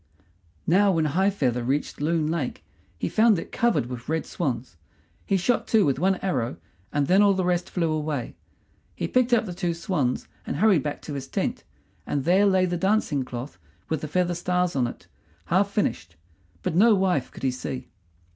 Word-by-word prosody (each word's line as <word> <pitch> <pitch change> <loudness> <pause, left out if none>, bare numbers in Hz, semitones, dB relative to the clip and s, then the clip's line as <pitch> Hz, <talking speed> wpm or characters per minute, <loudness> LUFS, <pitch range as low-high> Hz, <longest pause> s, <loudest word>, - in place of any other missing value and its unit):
Now 195 +3 +4
when 160 -2 +1
High 185 +7 +2
feather 125 -11 0
reached 140 +4 -2
Loon 160 +1 +1
Lake 155 -7 -3 0.3
he - - -2
found 220 -2 +4
it - - -6
covered 235 - +1
with 120 +1 -7
red 160 0 0
swans. 125 - -3 0.5
He 195 - +3
shot 230 +7 0
two 215 -4 +4
with 135 -1 +1
one 190 +3 +3
arrow, 130 -11 -1 0.3
and 145 -1 +1
then 185 +7 +4
all 200 -1 +5
the 185 -1 0
rest 175 -1 0
flew 165 -3 0
away. 150 -5 -2 0.6
He - - -2
picked 255 -1 +2
up 235 -2 +4
the 180 - -5
two 175 -1 -2
swans 160 -7 -1 0.2
and - - -4
hurried 185 -1 +4
back 145 0 -4
to 150 - -6
his 140 -2 -5
tent, - - -2 0.4
and 140 - -1
there 190 +6 +4
lay 190 -1 +3
the 175 -1 -1
dancing 190 -6 +1
cloth 125 -3 -7 0.3
with 160 -3 -1
the 155 - -4
feather 175 +3 +1
stars 180 0 0
on 125 -3 +2
it - - -9 0.4
half 195 +4 +2
finished, 85 - -2 0.5
but - - -1
no 210 +6 +6
wife 185 -8 +1
could - - -13
he 130 - +2
see. 130 0 -6
170 Hz, 195 wpm, -25 LUFS, 140-190 Hz, 0.6 s, no